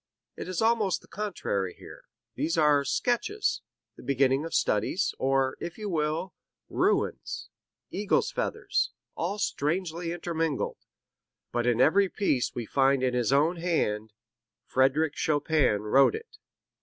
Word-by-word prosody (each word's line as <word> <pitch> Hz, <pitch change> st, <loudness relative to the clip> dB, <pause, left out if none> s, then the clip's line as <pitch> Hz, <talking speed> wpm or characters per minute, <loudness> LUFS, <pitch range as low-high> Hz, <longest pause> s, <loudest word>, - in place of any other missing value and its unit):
It -, -, -7 dB
is 185 Hz, +3 st, -1 dB
almost 220 Hz, -6 st, +2 dB
the -, -, -19 dB
contrary 100 Hz, -, -3 dB
here; -, -, -13 dB, 0.3 s
these 165 Hz, +1 st, -1 dB
are 150 Hz, -2 st, +4 dB
sketches, 410 Hz, -, 0 dB, 0.4 s
the -, -, -11 dB
beginning 135 Hz, +2 st, +2 dB
of 165 Hz, -, -4 dB
studies, 160 Hz, -, +1 dB
or, 135 Hz, 0 st, +1 dB
if 170 Hz, -, -6 dB
you 210 Hz, -2 st, -4 dB
will, 155 Hz, +3 st, -1 dB, 0.4 s
ruins, -, -, 0 dB, 0.4 s
eagles' 205 Hz, +1 st, +1 dB
feathers, -, -, -1 dB, 0.2 s
all 205 Hz, -, -2 dB
strangely 170 Hz, -1 st, -1 dB
intermingled. 165 Hz, -4 st, -2 dB, 0.7 s
But 120 Hz, 0 st, 0 dB
in 120 Hz, -1 st, +2 dB
every 190 Hz, +8 st, +4 dB
piece 145 Hz, -, 0 dB
we 120 Hz, -, -3 dB
find 135 Hz, +2 st, +2 dB
in 130 Hz, -1 st, +1 dB
his 125 Hz, 0 st, +1 dB
own 155 Hz, +6 st, +3 dB
hand, 110 Hz, -11 st, -1 dB, 0.5 s
'Frederic 135 Hz, +4 st, +2 dB
Chopin 150 Hz, -7 st, +1 dB
wrote 135 Hz, +6 st, +4 dB
it.' 460 Hz, +1 st, -10 dB
155 Hz, 130 wpm, -28 LUFS, 130-180 Hz, 0.7 s, are